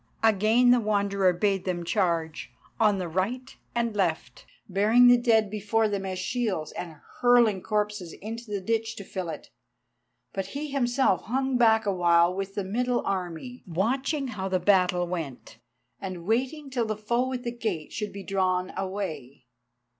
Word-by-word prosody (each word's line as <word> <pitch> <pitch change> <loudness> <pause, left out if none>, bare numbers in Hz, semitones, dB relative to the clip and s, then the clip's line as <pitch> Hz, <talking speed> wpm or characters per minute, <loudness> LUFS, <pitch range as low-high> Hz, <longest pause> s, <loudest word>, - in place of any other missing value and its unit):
Again 225 +3 +4
the 245 - +5
Wanderer 200 -3 +2
bade 195 +1 0
them 175 -2 -2
charge 170 -4 -1 0.3
on 210 -3 +4
the 180 -2 -3
right 200 +10 -3 0.2
and 235 -2 0
left, 175 -5 -2 0.2
bearing 210 +6 +4
the 245 - +8
dead 225 -4 +2
before 215 +1 +1
them 200 -2 -3
as 185 -1 -3
shields, 190 -5 -2
and 170 -3 -7 0.3
hurling 240 -5 +4
corpses 210 -4 -2
into 230 +2 -8
the 200 -2 -2
ditch 225 +2 -1
to 200 - -8
fill 185 -2 -5
it. 155 - -8 0.8
But 195 -1 -3
he 300 0 -4
himself 245 -8 +1
hung 265 +2 0
back 225 -2 +4
awhile 175 -2 +3
with 195 +1 -5
the 205 - -1
middle 245 +5 -1
army, 190 +6 -4
watching 260 - -1
how 195 -4 -4
the 185 -1 +1
battle 180 -1 +3
went, 140 -11 -6 0.4
and 185 -3 -6
waiting 265 - -1
till 245 -3 0
the 215 -1 -2
foe 240 +4 0
at 250 -1 -4
the 240 - -2
gate 215 -10 -4
should 210 -2 -3
be 200 0 -8
drawn 185 -1 0
away. 170 -10 -5
205 Hz, 160 wpm, -27 LUFS, 185-235 Hz, 0.8 s, the